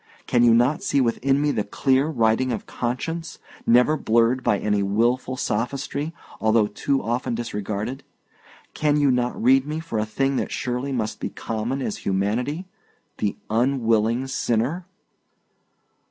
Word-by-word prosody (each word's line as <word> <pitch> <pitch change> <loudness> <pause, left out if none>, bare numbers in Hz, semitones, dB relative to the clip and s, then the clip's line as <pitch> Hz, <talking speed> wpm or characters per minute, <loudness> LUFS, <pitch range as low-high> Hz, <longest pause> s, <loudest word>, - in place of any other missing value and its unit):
Can 120 - +2
you 115 -1 +6
not 125 +6 +2
see 140 - +1
within 135 +2 +2
me 145 0 +2
the 105 - 0
clear 135 +6 +1
writing 125 -3 +1
of 115 - -3
conscience, 160 +7 -4 0.3
never 125 +6 +5
blurred 120 -1 +2
by 105 - +2
any 105 0 0
wilful 120 +6 +1
sophistry, 140 +7 -2 0.3
although 110 0 +3
too 135 +6 -1
often 120 +1 -1
disregarded? 110 +2 -4 0.7
Can 150 -1 +1
you 145 -2 +4
not 125 -1 0
read 130 +3 +4
me 155 +1 -3
for 160 -9 -3
a 105 - 0
thing 135 +5 0
that - - -2
surely 125 +3 -2
must 110 -5 -2
be - - -3
common 115 +5 -3
as 215 - -3
humanity 120 - -1 0.5
the 105 -2 -1
unwilling 115 0 +2
sinner?" 135 +7 -1
125 Hz, 145 wpm, -23 LUFS, 110-140 Hz, 0.7 s, you